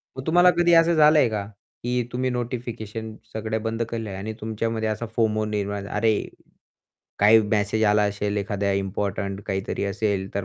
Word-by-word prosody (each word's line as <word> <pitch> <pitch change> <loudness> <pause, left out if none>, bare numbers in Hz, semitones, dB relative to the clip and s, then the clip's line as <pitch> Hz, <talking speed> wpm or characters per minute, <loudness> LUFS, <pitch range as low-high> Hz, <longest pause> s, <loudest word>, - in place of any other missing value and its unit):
मग 130 - -7
तुम्हाला 175 +2 +6
कधी 175 0 +4
असं 165 +1 +5
झालं 155 -1 +6
आहे 130 - +4
का, 105 -2 -3 0.4
की 125 0 0
तुम्ही 130 +1 -1
नोटिफिकेशन 115 -3 -5 0.2
सगळं 110 0 -2
बंद 115 0 -2
केले 115 -2 -4
आहे 95 - -6
आणि 110 +3 -5
तुमच्यामध्ये 110 0 -2
असा 110 +2 -3
फोमो 110 -2 +1
निर्माण 100 -1 -3
"अरे 110 +1 +1 1.1
काही 110 +2 +7
मेसेज 105 +1 0
आला 105 0 +4
असेल, 100 0 -2
एखाद्या 100 -1 -1
इम्पोर्टंट 100 0 -2
काहीतरी 95 0 -2
असेल 100 -1 -1
तर 100 -1 -2
110 Hz, 165 wpm, -24 LUFS, 100-115 Hz, 1.1 s, काही